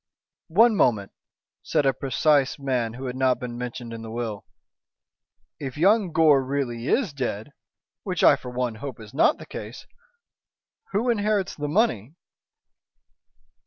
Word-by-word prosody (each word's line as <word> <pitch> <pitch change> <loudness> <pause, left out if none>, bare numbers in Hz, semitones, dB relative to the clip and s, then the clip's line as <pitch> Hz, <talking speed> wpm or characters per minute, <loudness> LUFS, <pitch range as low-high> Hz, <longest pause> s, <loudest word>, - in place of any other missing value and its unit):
"One 220 +7 +5
moment," 110 - +2 0.5
said 145 - 0
a 135 - +3
precise 135 +2 +1
man 125 -5 -2
who 130 +2 -7
had 125 -1 -4
not 130 -1 +2
been 125 -2 -6
mentioned 120 -1 -6
in 115 - -7
the 115 - -8
will. 115 -3 -5 1.1
"If 135 -2 -6
young 195 +2 +3
Gore 155 -4 +4
really 130 -3 -3
is 220 - +1
dead 125 -2 -4 0.5
which 180 -4 -3
I - - +7
for 130 -2 -9
one, 125 -1 -2
hope 135 -5 -6
is 110 -1 -12
not 140 - +3
the - - -11
case - - -8 1.1
who 230 +5 +1
inherits 210 -3 0
the 145 -1 -4
money?" 145 - 0
135 Hz, 145 wpm, -24 LUFS, 120-160 Hz, 1.1 s, I